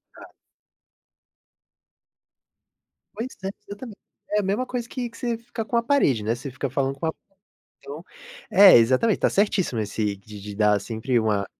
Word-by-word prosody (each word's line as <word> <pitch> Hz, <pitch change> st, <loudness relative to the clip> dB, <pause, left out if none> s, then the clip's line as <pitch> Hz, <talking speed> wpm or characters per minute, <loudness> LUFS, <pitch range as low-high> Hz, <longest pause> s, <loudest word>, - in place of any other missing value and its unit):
Tá. -, -, -14 dB, 2.8 s
Pois 235 Hz, +3 st, -3 dB, 0.2 s
é, 190 Hz, -, -2 dB, 0.2 s
eu 200 Hz, -, -7 dB
também, 230 Hz, -4 st, -9 dB, 0.4 s
é 210 Hz, -, +2 dB
a -, -, -1 dB
mesma 205 Hz, +7 st, -1 dB
coisa 245 Hz, -2 st, -5 dB
que 250 Hz, -2 st, -4 dB
que 230 Hz, -, -16 dB
você 235 Hz, -2 st, -2 dB
fica 230 Hz, -1 st, -6 dB
com 235 Hz, +2 st, -1 dB
a 235 Hz, -, +2 dB
parede, 185 Hz, -, +2 dB
né, 110 Hz, -, 0 dB
você 125 Hz, +4 st, -6 dB
fica 135 Hz, +2 st, -4 dB
falando 135 Hz, +1 st, -1 dB
com 165 Hz, -, -3 dB
a 160 Hz, -, +1 dB, 0.7 s
então. -, -, -9 dB, 0.5 s
É, 195 Hz, -4 st, +9 dB
exatamente, 130 Hz, -, +3 dB
tá -, -, +3 dB
certíssimo 190 Hz, -, +1 dB
esse 105 Hz, -1 st, -2 dB
de 105 Hz, +1 st, -12 dB
de 105 Hz, -1 st, -7 dB
dar 105 Hz, -1 st, +3 dB
sempre 115 Hz, +3 st, -1 dB
uma 105 Hz, -3 st, 0 dB
140 Hz, 170 wpm, -24 LUFS, -, 2.8 s, É